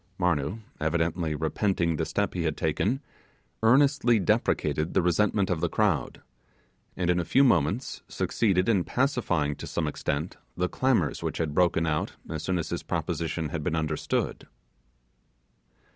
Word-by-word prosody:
Marnoo, 90 +3 0 0.2
evidently 80 0 0
repenting 85 +2 0
the - - -1
step - - -1
he - - -2
had - - -1
taken, 125 - 0 0.6
earnestly 125 0 +4
deprecated 75 -3 0
the 95 - +5
resentment 95 +2 +2
of 80 -3 -1
the 85 - +1
crowd, 100 -9 0 0.7
and, 90 -1 +1
in 90 - +1
a - - 0
few 130 - +4
moments 100 - +1
succeeded 95 -5 +1
in 100 -6 +3
pacifying 100 - 0
to - - -8
some 85 - -2
extent 75 +2 -3 0.2
the 90 - +1
clamours 115 - +1
which - - -3
had 80 -3 -1
broken 85 -1 +2
out 75 -1 -1 0.2
as 80 -1 -3
soon 90 +2 -1
as 85 - -3
his - - -3
proposition 80 -1 -2
had 80 +1 -3
been 80 +1 -1
understood. 80 -1 -2
85 Hz, 150 wpm, -27 LUFS, 80-105 Hz, 0.7 s, the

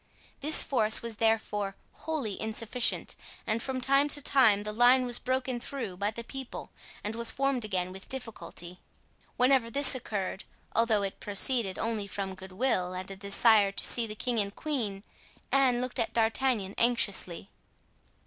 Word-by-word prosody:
This 300 +3 +5
force 220 -5 +2
was 230 -2 -6
therefore 210 -3 0 0.2
wholly 285 -11 -4
insufficient, 230 +2 0 0.3
and 225 +1 -1
from 260 0 -3
time 275 +3 +3
to 290 - 0
time 245 -8 +4
the 210 0 -4
line 245 +3 +5
was 245 -1 0
broken 255 -1 -1
through 245 -7 -5
by 200 +3 -1
the 235 +2 -7
people 265 +1 -8 0.3
and 210 - -3
was 235 0 +1
formed 275 -3 0
again 185 -3 -2
with 190 0 -11
difficulty. 180 -8 -6 0.6
Whenever 250 -2 +3
this 280 +3 +4
occurred, 205 -6 -4 0.3
although 225 -2 +2
it 195 - -4
proceeded 205 -1 +1
only 220 -3 -2
from 195 -1 -4
goodwill 185 0 -2
and 185 +1 -6
a - - -6
desire 200 +1 +3
to - - +1
see 235 -2 +3
the 215 - -6
king 240 +1 -1
and 200 0 -1
queen, 225 -11 -3 0.5
Anne 260 -3 +3
looked 255 0 -4
at 230 - -1
D'Artagnan 225 -3 +1
anxiously. 205 -6 +1
225 Hz, 160 wpm, -29 LUFS, 200-255 Hz, 0.6 s, This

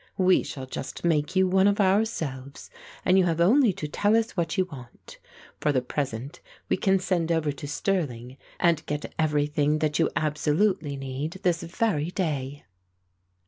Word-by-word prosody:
"We 185 -1 +4
shall 135 -2 -7
just 130 +5 -6
make 155 +1 +1
you 190 0 +4
one 190 +1 +4
of 205 +1 +2
ourselves 165 -10 -1 0.3
and 185 +1 +5
you 185 - +4
have 170 -2 0
only 225 +7 +5
to 150 - -5
tell 205 +8 +2
us 225 0 0
what 170 -4 -2
you 185 - +3
want. 130 -8 -13 0.4
For 150 - +1
the 130 -3 0
present 135 +3 -4 0.3
we - - +2
can 190 +1 +3
send 175 -3 -1
over 160 -3 +1
to 145 +1 -8
Stirling 135 -8 -2 0.2
and 170 -2 +2
get 150 0 -4
everything 150 -1 +1
that 155 0 0
you 165 - +3
absolutely 155 +1 0
need 135 +4 -4
this 175 -2 +1
very 170 -3 -1
day." 145 -6 -3
160 Hz, 165 wpm, -26 LUFS, 145-185 Hz, 0.4 s, and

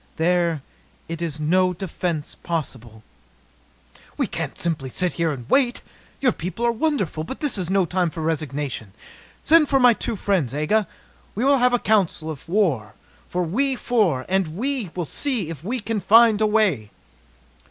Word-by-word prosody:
There 170 -3 +1 0.4
is 165 -2 -4
no 180 +4 +2
defence 175 -4 -4
possible." 125 -9 -5 1.1
"We - - +1
can't - - -5
simply 155 -6 -2
sit 180 +7 0
here 165 -2 0
and 125 -5 -7
wait! 255 -3 +2 0.4
Your 260 -3 +4
people 185 +5 -4
are 235 - +4
wonderful, 230 - -1
but 265 - -7
this 295 -4 0
is 185 -4 -3
no 190 -1 +3
time 180 0 0
for 160 0 -7
resignation. 145 -9 -3 0.5
Send 320 -2 +5
for 270 - +3
my 250 -2 +7
two 225 - -3
friends, 180 - 0
Aga. 200 +8 +1 0.5
We 230 +6 0
will 280 -1 +4
have 250 0 +4
a - - +5
council 195 -8 +1
of 150 +1 -10
war, 155 - 0 0.4
we 200 +11 0
four, 205 - +1
and 190 -1 +1 0.6
see 225 - -2
if 155 -2 -9
we 245 +7 -2
can 225 0 -2
find 220 +2 +5
a 215 - +4
way!" 200 - +1
180 Hz, 155 wpm, -23 LUFS, 155-220 Hz, 1.1 s, my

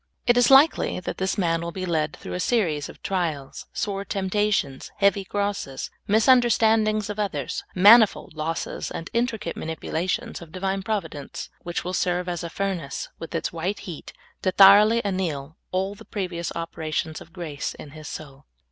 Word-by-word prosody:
It 240 - +5
is 245 0 +5
likel} 275 - +5
that - - -4
this 190 +2 0
man 165 -3 +1
will 170 0 -4
be 185 +1 -4
led 155 -3 0
through - - -8
a - - -2
vSeries 180 -8 0
of - - -14
trials, 160 -8 -3
vSore 200 -2 -2
temptations, 195 -8 0
heavy 200 0 +3
crosses, 200 -9 -3 0.2
misun 225 +4 +6
derstandings 220 -2 +2
of 210 - -7
others, 160 - -2
manifold 210 0 +6
losses, 160 +2 -3
and 165 - -6
intricate 235 -2 -1
manipulations 160 +3 -3
of 165 -2 -11
Divine 195 +2 -2
Providence, 190 -9 -4
which 175 0 -3
will 180 - -4
ser^^e 180 0 0
as 175 -1 -3
a 170 - -4
furnace, 180 -6 -3
with 165 +1 -7
its 165 - -2
white 180 +5 -2
heat, 170 -5 -8 0.3
to 185 - +1
thoroughly 205 +4 +7
anneal 165 -6 -2
all 190 +2 -1
the 210 +2 -13
previous 180 -4 -4
operations 160 -1 -3
of - - -13
grace 165 -6 -5
in 145 - -11
his 155 0 -10
soul. 140 -2 -9
185 Hz, 165 wpm, -25 LUFS, 160-205 Hz, 0.3 s, thoroughly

